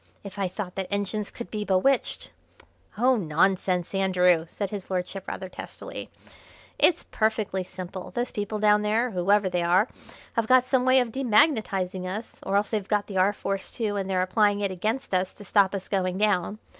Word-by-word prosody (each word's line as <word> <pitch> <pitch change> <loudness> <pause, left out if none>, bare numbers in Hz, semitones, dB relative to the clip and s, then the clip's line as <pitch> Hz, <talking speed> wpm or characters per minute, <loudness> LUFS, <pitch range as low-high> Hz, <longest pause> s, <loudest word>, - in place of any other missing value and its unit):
If 200 0 -9
I 195 - +1
thought 185 0 -6
that 190 -1 -2
engines 205 +1 -2
could 235 - -9
be 210 -1 -2
bewitched 205 +8 +1 0.3
" - - -30
"Oh, 250 +3 +4
nonsense, 180 +1 +1
Andrew!" 180 -3 +3
said 200 +3 -4
his 200 -3 -6
lordship 185 +1 -3
rather 190 - -5
testily. 180 - -8 0.7
"It's 345 - +4
perfectly 215 -3 0
simple: 185 0 -8
those 245 +1 -2
people 205 +1 -3
down 210 0 +4
there, 225 +4 +1
whoever 200 +2 +2
they 180 -1 0
are, 180 +6 +3 0.5
have 230 -1 0
got 255 0 +6
some 255 -1 +1
way 260 0 +6
of 240 -2 -3
demagnetising 215 - +1
us, 210 +5 -6
or 195 - -2
else 205 0 +1
they've 210 -3 -2
got 205 -1 +1
the 195 - -5
R. 190 +2 +4
Force 195 -1 -4
too, 215 -4 -2
and 195 -1 -2
they're 185 -1 +2
applying 205 +2 +2
it 200 -2 0
against 215 +7 -3
us 185 0 0
to 205 - -12
stop 200 0 +3
us 190 -1 -5
going 185 -2 -1
down. 205 -1 +1
200 Hz, 190 wpm, -26 LUFS, 185-215 Hz, 0.7 s, got